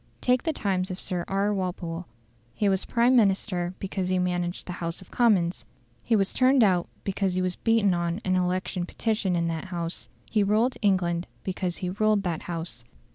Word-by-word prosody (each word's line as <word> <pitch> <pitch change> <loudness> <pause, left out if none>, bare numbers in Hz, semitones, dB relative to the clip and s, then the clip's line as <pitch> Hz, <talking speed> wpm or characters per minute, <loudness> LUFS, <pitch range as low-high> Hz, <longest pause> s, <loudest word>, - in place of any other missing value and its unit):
Take 250 -1 +2
the 320 - 0
times 190 -8 -1
of 185 0 -5
Sir 180 -2 -2
R. 200 +2 +1
Walpole. 180 -3 -3 0.5
He 210 - +1
was 190 -1 +1
Prime 240 +2 +3
Minister 190 -5 +2
because 190 -1 -3
he 185 - +2
managed 180 -1 -1
the - - -5
House 170 0 -2
of 185 - -12
Commons; 195 -7 +2 0.4
he 230 - +1
was 195 -2 +1
turned 260 -1 +5
out 180 -4 +3 0.2
because 195 -1 -1
he 185 - +1
was 180 -1 -1
beaten 225 -4 +3
on 170 +1 -1
an 185 0 +2
election 180 0 -1
petition 210 -4 0
in 170 -1 +1
that 165 +2 -3
House; 170 -2 -4 0.2
he 215 - +3
ruled 220 +5 +2
England 180 -4 +1 0.2
because 185 -2 -2
he 180 - -1
ruled 215 +1 +2
that 170 -4 -2
House. 165 -9 -4
185 Hz, 185 wpm, -26 LUFS, 175-210 Hz, 0.5 s, turned